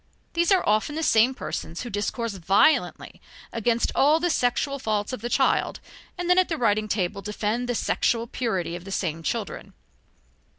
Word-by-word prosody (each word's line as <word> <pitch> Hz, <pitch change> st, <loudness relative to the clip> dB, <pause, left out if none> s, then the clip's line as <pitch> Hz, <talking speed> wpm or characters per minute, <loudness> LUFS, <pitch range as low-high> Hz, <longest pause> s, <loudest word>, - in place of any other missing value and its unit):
These 340 Hz, +1 st, +1 dB
are 380 Hz, -, +3 dB
often 215 Hz, +8 st, +1 dB
the 320 Hz, -, -2 dB
same 235 Hz, 0 st, +4 dB
persons 165 Hz, -7 st, -5 dB
who 240 Hz, -, -7 dB
discourse 215 Hz, +2 st, -2 dB
violently 195 Hz, -, +1 dB, 0.3 s
against 230 Hz, +1 st, 0 dB
all 300 Hz, +4 st, +4 dB
the 350 Hz, +1 st, +1 dB
sexual 275 Hz, +2 st, 0 dB
faults 215 Hz, -2 st, -2 dB
of 255 Hz, -, -5 dB
the 240 Hz, -, -3 dB
child -, -, +1 dB, 0.4 s
and 355 Hz, -1 st, -3 dB
then 360 Hz, +1 st, +5 dB
at 370 Hz, -, +2 dB
the 325 Hz, -, -1 dB
writing 215 Hz, -3 st, +1 dB
table 200 Hz, -2 st, -1 dB
defend 215 Hz, +4 st, -2 dB
the 245 Hz, -, 0 dB
sexual 230 Hz, +1 st, 0 dB
purity 190 Hz, -9 st, -2 dB
of 175 Hz, -, -8 dB
the 195 Hz, -, -9 dB
same 165 Hz, -4 st, -2 dB
children. 220 Hz, +5 st, -4 dB
230 Hz, 175 wpm, -25 LUFS, 205-265 Hz, 0.4 s, then